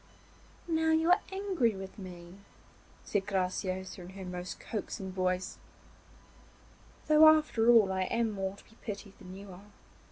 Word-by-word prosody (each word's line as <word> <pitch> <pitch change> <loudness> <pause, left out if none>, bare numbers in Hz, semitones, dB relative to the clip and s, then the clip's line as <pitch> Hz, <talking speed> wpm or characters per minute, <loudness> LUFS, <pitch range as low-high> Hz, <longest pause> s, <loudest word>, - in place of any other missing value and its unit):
'Now 320 -1 +1
you 320 +2 +3
are 370 +3 +5
angry 380 - 0
with 190 +2 -8
me,' 180 0 -10 0.7
said 205 -1 -1
Graciosa 185 -1 -2
in 175 - -9
her 190 0 -8
most 180 0 -6
coaxing 195 -3 -5
voice, 185 0 -1 1.5
'though 310 +1 +7
after 305 -7 +4
all 220 -5 +6
I 190 0 0
am 230 +2 0
more 195 -1 -3
to - - -17
be 225 - -21
pitied 200 -2 -6
than 185 -2 -10
you 200 0 -10
are. 195 +3 -13
195 Hz, 150 wpm, -31 LUFS, 185-235 Hz, 1.5 s, though